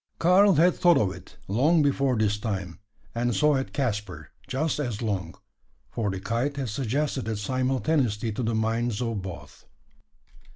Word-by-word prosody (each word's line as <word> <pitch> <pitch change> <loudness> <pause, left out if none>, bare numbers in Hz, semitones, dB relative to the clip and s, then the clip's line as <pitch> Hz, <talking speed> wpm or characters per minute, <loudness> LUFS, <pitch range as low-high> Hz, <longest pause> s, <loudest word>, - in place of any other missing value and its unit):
Karl 190 +3 +5
had 175 +4 +5
thought 175 -1 +4
of 100 -4 +1
it, - - -14
long 150 - +3
before 135 -3 +1
this 105 -1 +1
time; 95 -5 -4 0.3
and 120 0 0
so 150 0 +4
had 135 -1 -1
Caspar, 105 - -3 0.2
just 140 +4 -1
as 120 -6 -3
long: 95 -6 -2 0.6
for 110 -3 -1
the 95 -1 -3
kite 120 +8 -2
had 135 -4 -2
suggested 135 +3 -2
it 110 -1 -2
simultaneously 130 -1 0
to 105 - -4
the 115 -1 0
minds 115 0 0
of 115 -4 -2
both. 80 -7 -10
120 Hz, 160 wpm, -26 LUFS, 105-140 Hz, 0.6 s, Karl